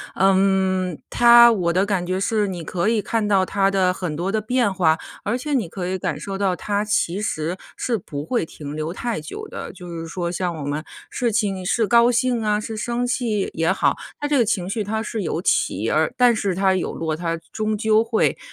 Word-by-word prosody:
嗯， 190 -2 +2
它 235 0 +7
我 180 -6 0
的 185 +3 +2
感 195 -4 -1
觉 185 +1 -1
是 210 +2 +1
你 180 -3 -5
可 175 +4 -2
以 225 -1 +2
看 220 0 -1
到 195 -2 +3
它 195 +1 +1
的 190 -2 +2
很 180 -4 -4
多 180 +5 -2
的 220 - +1
变 235 -1 +1
化， 160 -4 +3 0.3
而 225 +4 0
且 290 +4 -4
你 230 -10 +1
可 180 +1 -5
以 190 - -1
感 170 -5 -3
受 195 +5 -5
到 195 -2 +1
它 205 +2 -2
其 200 -2 0
实 170 -3 -2 0.2
是 240 -2 -1
不 145 -6 -6
会 235 -1 0
停 145 -2 -8
留 155 +2 -3
太 235 0 -3
久 150 - -7
的。 - - -7
就 180 -2 -10
是 165 -1 -6
说 170 +1 -3
像 175 -1 -2
我 150 - -6
们 145 +2 -3 0.2
事 235 -3 -1
情 200 -4 0
是 225 +4 +2
高 235 +3 +5
兴 245 -1 +1
啊， 210 0 +1
是 220 +1 -6
生 240 +3 -1
气 240 -5 -1
也 165 0 0
好， - - +1 0.2
它 290 - 0
这 290 -1 +2
个 240 - +4
情 190 -4 -1
绪 210 +1 -2
它 220 +2 -2
是 225 0 -4
有 170 -1 -2
起 110 - +1
而， 160 +9 +1
但 245 -2 +5
是 200 -5 -1
它 190 0 +2
有 185 - -2
落， 160 -1 -2
它 165 -1 -2
终 215 -1 -1
究 220 0 +3
会， 225 -1 +1
195 Hz, 240 characters per minute, -22 LUFS, 175-220 Hz, 0.3 s, 它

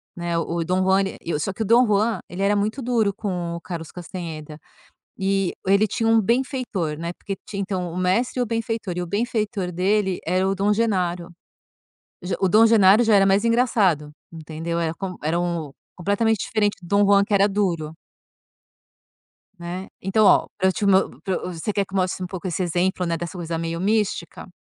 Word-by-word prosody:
né, 175 -1 -3
o 165 0 -2
o - - 0
Dom 185 +2 +1
Juan, 190 +1 +3 0.2
ele 165 -3 -2
só 185 +6 -2
que 210 - -7
o - - -4
Dom 235 +4 +5
Juan, 215 +2 +1
ele 180 +2 -6
era 205 +1 +3
muito 215 +6 -1
duro 230 -5 +1
com 180 -5 -3
o 170 - -7
Carlos 165 -3 -7
Castaneda, 165 -4 -7 0.6
e 195 -1 0
ele 200 +3 +4
tinha 225 0 -1
um 225 0 +5
benfeitor, 235 - -1
né, 170 +1 -4
porque 195 +2 -6
ti 200 - -6
então, 185 -3 -3
o - - -7
mestre 195 +8 +1
e - - +3
o - - -1
benfeitor, 225 -4 -3
e 180 - -1
o - - -4
benfeitor 210 -1 -2
dele 190 +1 +1
era 185 +3 +1
o 195 - +1
Dom 200 +2 +2
Genaro. 180 -6 0 1.0
Ge 180 - -2
o 190 - +4
Dom 215 +5 +6
Genaro 215 0 +6
já 220 -2 +4
era 195 -1 +5
mais 195 +2 +3
engraçado, 210 - +2 0.2
entendeu, 165 +1 -5
era 165 -1 -1
com 190 -1 -5
era 160 +3 0
um 170 -4 -2
o - - -19 0.2
completamente 205 +4 +1
diferente 205 -2 0
do 175 - -12
Dom 200 +2 +3
Juan, 200 0 +5
que 205 - -3
era 200 0 +5
duro. 175 -6 -1 1.7
Né. 175 +2 -6
Então 205 +3 +2
ó, - - +5
pra 190 - +3
eu - - +2
te 205 - -2
mo 190 -1 +2
pra 190 - -1
eu 180 - -4
você 170 +5 -3
quer 200 0 0
que 195 0 -14
mostre 185 -1 0
um - - -2
pouco 185 +1 -6
esse 185 +1 -2
exemplo, 180 +1 0
né, 170 -1 0
dessa 175 +3 -6
coisa 165 -1 -3
meio 165 0 -3
mística? 200 -4 -1
190 Hz, 205 wpm, -23 LUFS, 175-210 Hz, 1.7 s, Dom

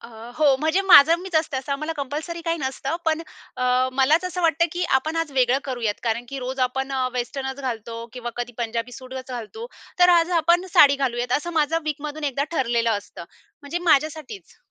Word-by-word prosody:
अ, 235 - -12 0.3
हो 285 -3 +4
म्हणजे 320 +5 +2
माझं 335 -3 +8
मीच 375 -2 -9
असते, 315 -3 0
असं 275 +2 -3
आम्हाला 305 +3 -3
कंपल्सरी 300 +5 -4
काही 335 - +1
नसतं, 270 +2 -3
पण 320 0 0 0.3
अ, 250 +1 +2
मलाच 280 +7 +3
असं 365 0 -3
वाटतं, 330 0 +3
की 355 0 -2
आपण 315 +5 -5
आज 330 -3 -2
वेगळं 255 -1 +3
करूयात 240 -6 -3
कारण 235 +1 -1
की 275 +1 -6
रोज 260 +1 -5
आपण 265 +2 -4
अ, 260 -1 0
वेस्टर्नच 265 +2 -4
घालतो 230 -3 -5 0.2
किंवा 245 -1 -6
कधी 245 0 -4
पंजाबी 235 +1 -3
सूटच 260 +1 -9
घालतो, 250 - -7 0.3
तर 355 0 +6
आज 335 +1 0
आपण 345 +3 +3
साडी 280 -1 +7
घालूयात, 245 -2 -2
असं 345 +4 -7
माझा 320 +3 +1
वीकमधून 300 0 -4
एकदा 280 +2 -1
ठरलेलं 235 -3 +1
असतं. 200 -4 -11 0.4
म्हणजे 285 +4 -4
माझ्यासाठीच. 310 +6 -1
275 Hz, 190 wpm, -23 LUFS, 250-320 Hz, 0.4 s, माझं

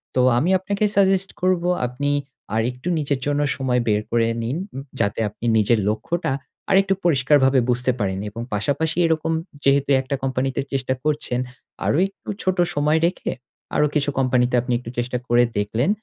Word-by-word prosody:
তো 130 - +4 0.2
আমি 160 +9 +1
আপনাকে 200 +2 -2
সাজেস্ট 195 -1 +3
করব, 185 -1 +2 0.2
আপনি 145 +4 -2 0.4
আরেকটু 125 +7 -2
নিজের 140 -2 -1
জন্য 145 0 +1
সময় 125 -2 0
বের 105 -1 +2
করে 115 -1 +2 0.2
নিন 125 +6 -2 0.4
যাতে 100 +2 0
আপনি 105 - -9
নিজের 110 +1 +3
লক্ষ্যটা 160 +9 -2 0.4
আরেকটু 195 0 +4
পরিষ্কারভাবে 135 -3 +4
বুঝতে 125 +1 +2
পারেন 95 -2 -1
এবং 115 +3 -7
পাশাপাশি 145 +10 -1
এরকম 160 0 0 0.3
যেহেতু 140 0 +3
একটা 135 +1 -3
কোম্পানিতে 130 0 -1
চেষ্টা 130 -1 0
করছেন, 150 -5 -1 0.5
আরো - - +2
একটু 195 - -14
ছোট 185 0 0 0.2
সময় 150 +2 +2
রেখে 180 - -3 0.4
আরো 150 - +4
কিছু 145 -1 +2
কোম্পানিতে 125 -1 +2
আপনি 125 0 -2
একটু 120 - -9
চেষ্টা 125 +1 -1
করে 120 +1 +4
দেখলেন 110 - 0
135 Hz, 155 wpm, -22 LUFS, 120-160 Hz, 0.5 s, তো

